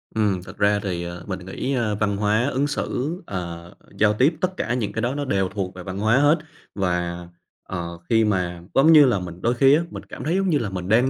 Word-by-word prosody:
Ừm, 100 -5 +1
thật 95 +2 -12
ra 105 0 +3
thì 85 -3 -3 0.2
mình 95 -1 -3
nghĩ, 130 +8 -3
ơ, 110 -5 0
văn 100 -1 0
hóa 105 +4 +2
ứng 140 +1 0
xử, 150 +3 -3
ờ, 85 -2 -6 0.3
giao 105 0 +4
tiếp, 140 +9 +3
tất 185 0 -1
cả 120 - -1
những 115 -5 -1
cái 110 - -2
đó 125 +3 -1
nó 145 - -2
đều 95 -6 0
thuộc 95 -2 -4
về 90 - -8
văn 95 +1 -6
hóa 110 +4 +3
hết. 145 +3 +5 0.4
Và, 90 -2 -2 0.4
ờ, 85 -2 -5
khi 115 -1 +4
mà, 90 -4 -1
giống 155 +5 +6
như 150 -2 +9
là, 120 -6 +2
mình 90 -1 -8
đôi 120 +2 +2
khi 135 +3 +5
á, 160 - +2
mình - - -8
cảm - - -9
thấy 165 +4 0
giống 195 -1 +1
như 150 - +3
là 115 -6 -2
mình 90 0 -5
đang 120 +4 +4
105 Hz, 245 wpm, -23 LUFS, 90-130 Hz, 0.4 s, như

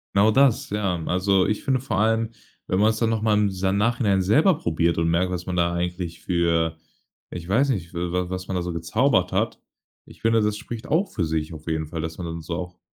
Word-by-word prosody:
Genau 105 +2 +5
das, 135 0 +3
ja. 95 -5 -1
Also, 95 +1 +2
ich 105 +1 -1
finde 130 -2 +1
vor 115 -7 -2
allem, 115 +1 +1 0.4
wenn 95 - 0
man's 110 +1 +3
dann 115 -1 +1
noch 110 -1 0
mal 110 -1 +2
im 105 -1 +3
sa 95 0 -1
Nachhinein 105 -2 +2
selber 145 - +4
probiert 85 0 0
und 85 0 +1
merkt, 90 +2 +1
was 90 -1 -4
man 90 - -3
da 85 0 +1
eigentlich 85 -1 -3
für 85 -2 +1 0.5
-ich 85 -1 -7
weiß 130 +9 +2
nicht- 90 -8 -2
w 90 +1 -2
was 95 +1 -5
man 95 - -3
da 90 - -1
so 85 -1 -4
gezaubert 90 - +1
hat, - - -1 0.4
ich - - -17
finde, 115 0 +3
das 105 0 0
spricht 115 0 -7
auch 185 +5 +1
für 90 - -1
sich 80 0 -2
auf 80 +1 -11
jeden 80 -1 -1
Fall, 80 0 -5
dass 80 0 -5
man 90 - -5
dann 85 0 -5
so 80 +2 -4
auch 90 0 -6
95 Hz, 230 wpm, -24 LUFS, 85-110 Hz, 0.5 s, Genau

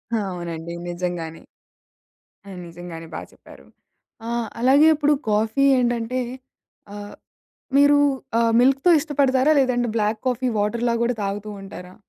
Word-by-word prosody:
అవునండి. 170 -5 -4
నిజంగానే. 175 -2 -5 1.2
నిజంగానే 170 -1 -9
బాగా - - -7
చెప్పారు. - - -17 0.6
ఆహ్, 235 -1 -2
అలాగే 275 +5 +5
ఇప్పుడు 295 0 +2 0.2
కాఫీ 220 +5 +1 0.2
ఏంటంటే 240 0 -1 0.7
ఆహ్, 205 0 -9 0.6
మీరు 285 +1 +6 0.4
ఆహ్, 230 0 +2
మిల్క్‌తో 270 +6 +3
ఇష్టపడతారా? 280 -1 +2
లేదంటే 245 -2 +1
బ్లాక్ 215 0 0
కాఫీ 255 0 0
వాటర్‌లా 235 +3 0
కూడా 240 +1 +1
తాగుతూ 205 +2 -4
ఉంటారా? 185 -2 -10
230 Hz, 110 wpm, -22 LUFS, 185-255 Hz, 1.2 s, మీరు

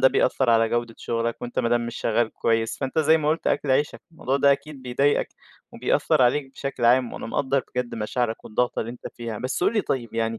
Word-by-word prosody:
ده 130 - +7
بيأثّر 130 -1 +2
على 115 -1 +4
جودة 120 0 -2
شُغلك، 115 0 -2
وأنت 120 - -5
ما 115 - +2
دام 120 0 +1
مش 120 - -6
شغّال 115 0 0
كويس 115 0 0
فأنت 135 +2 -2
زي 160 +1 +5
ما 150 -1 -1
قُلت 160 +2 0
أكْل 140 - +1
عيشك، 145 +3 +1
الموضوع 135 -4 -1
ده 140 0 +5
أكيد 140 -1 -6
بيضايقك 135 +3 +1 0.4
وبيأثّر - - +2
عليك 135 +2 +2
بشكل 135 -4 -4
عام 125 0 +4
وأنا - - -6
مقدّر 135 +2 0
بجد 125 -1 -2
مشاعرك 115 +1 -2
والضغطة 125 +3 -1
اللي 115 - -4
أنت 125 - -9
فيها. 115 -2 -5
بس 130 +8 -2
قُل - - +3
لي 215 - +2
طيب، 120 - -3
يعني 115 0 -1
125 Hz, 220 wpm, -24 LUFS, 115-135 Hz, 0.4 s, ده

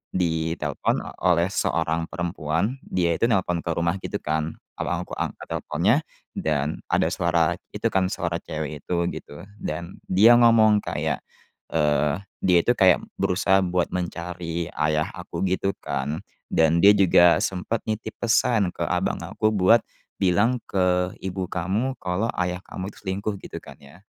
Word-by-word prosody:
ditelepon 80 -4 -1 0.2
oleh 90 0 +3
seorang 80 -3 0
perempuan, 90 - -2
dia 85 -2 +1
itu 115 - +3
nelpon 90 -6 +1
ke 85 - -2
rumah, 85 +2 0
gitu, - - -6
kan. 80 +1 -1 0.2
Abang - - -1
aku - - -11
angkat - - -4
teleponnya 90 +10 +1 0.4
dan 75 -1 -1
ada - - +1
suara 85 -1 +1 0.2
itu, - - 0
kan, 95 -1 +2
suara 85 -1 -2
cewek 75 -3 -5
itu, 90 - -2 0.2
gitu, 75 +5 -9 0.2
dan 85 +3 -5
dia 110 +6 +6
ngomong 110 -3 +6
kayak, - - -2 0.5
eee, 75 +1 +2 0.2
dia 90 -2 +5
itu 120 - +3
kayak 95 -2 +5 0.2
berusaha 95 +1 +3
buat 90 0 0
mencari 85 -1 -4
ayah 75 0 0
aku, - - -6
gitu, 95 +1 0
kan, 75 +4 -3 0.3
dan 80 +1 +3
dia 100 +1 +8
juga 90 -3 +5
sempat 95 +5 -2
nitip 110 0 -3
pesan 115 -3 +3
ke - - -4
abang - - 0
aku 110 - 0
buat, 105 +3 +5 0.4
"Bilang 115 +7 +3
ke 90 -1 +1
ibu 95 0 -3
kamu 100 +10 -1
kalau 90 +5 -1
ayah 90 0 -1
kamu 95 +2 -6
itu - - -17
selingkuh." 100 +2 -2
Gitu, - - -8
kan, - - -12
ya. 70 +6 -16
90 Hz, 150 wpm, -24 LUFS, 80-95 Hz, 0.5 s, dia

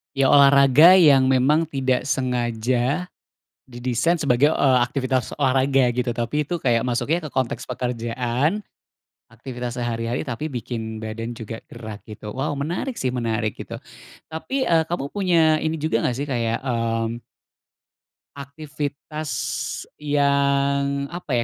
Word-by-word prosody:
Ya, 135 -1 +3
olahraga 140 +3 +7
yang 145 -8 +6
memang 135 +5 +3
tidak 130 -5 -1
sengaja, 125 +4 -1 0.6
didesain 130 +7 -1
sebagai, 140 +2 +3
eee, 130 -2 +3
aktivitas 130 -2 -2
olahraga 135 -1 +2
gitu. 120 0 -1
Tapi, 120 +6 -1
tuh, 170 +2 -4
kayak 120 -2 +2
masuknya 150 +7 -1
ke - - -5
konteks 130 -3 -2
pekerjaan, 125 - -2 0.7
aktivitas 120 +1 -7
sehari 115 -1 -2
hari 120 - -1
tapi 140 +4 -4
bikin 115 -4 -5
badan 115 +2 -6
juga 115 -1 -7
gerak 110 -2 -9
gitu. 105 0 -8
Wow, 140 +2 -2
menarik, 175 - -3
sih, 130 -1 -1
menarik 115 -3 -1
gitu. - - -7 0.5
Tapi 260 +12 -3
eee, 165 -1 +3
kamu 170 -5 -2
punya 165 -6 +3
ini 160 0 -1
juga 150 -7 0
nggak, 125 - -1
sih, 140 - -2
kayak, 115 -4 -1
mmm 115 -1 -1 1.1
aktivitas 145 +1 -6 0.7
yang 140 -1 +1
apa, 160 -8 -2
130 Hz, 130 wpm, -22 LUFS, 120-150 Hz, 1.1 s, olahraga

